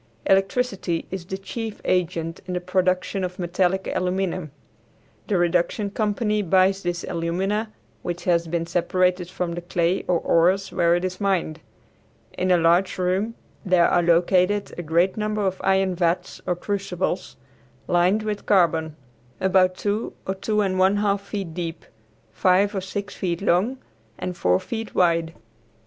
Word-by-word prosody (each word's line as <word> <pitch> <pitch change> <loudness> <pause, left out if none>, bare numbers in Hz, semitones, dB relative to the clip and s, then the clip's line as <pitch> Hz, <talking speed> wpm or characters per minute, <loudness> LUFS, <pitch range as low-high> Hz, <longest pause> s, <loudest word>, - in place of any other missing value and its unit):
Electricity 195 -3 +1
is 185 -2 -5
the 190 - -4
chief 215 +3 -6
agent 165 -2 -1
in 180 - -3
the - - 0
production 185 +1 0
of 180 0 -4
metallic 185 +1 0
aluminum. 185 -2 -1 0.8
The 205 - +1
reduction 175 +4 +1
company 210 0 0
buys 190 +1 +3
this 175 -1 -3
alumina, 190 +6 -2 0.3
which 175 0 -4
has 170 -2 +2
been 165 0 -1
separated 180 +1 +1
from 180 -2 -3
the 175 - -5
clay 175 +1 0
or 180 - +3
ores 185 +4 +2
where 170 0 +3
it 175 +1 -1
is 185 +1 -5
mined. 180 -5 0 0.8
In 185 - -1
a 180 - +5
large 170 +4 +3
room 190 +5 0 0.3
there 180 -4 +4
are 175 - +3
located 180 +4 +2
a - - -4
great 170 +4 +1
number 210 -1 -1
of 190 0 -2
iron 190 -1 +2
vats 175 0 -1
or 180 - +1
crucibles, 190 -1 -3 0.5
lined 180 +5 +3
with 210 -1 -4
carbon, 165 -5 +2 0.4
about 185 -1 +3
two 205 +2 -2
or 190 - -1
two 210 +2 0
and 190 -2 0
one 190 +2 +4
half 205 -1 +1
feet 200 -4 -5
deep, 165 -1 -5 0.5
five 190 - +3
or 195 - -2
six 200 +2 -5
feet 175 -3 -2
long 200 +7 +1 0.4
and 180 -1 -4
four 90 - +2
feet 225 -2 -6
wide. 170 -2 +2
185 Hz, 155 wpm, -23 LUFS, 175-195 Hz, 0.8 s, a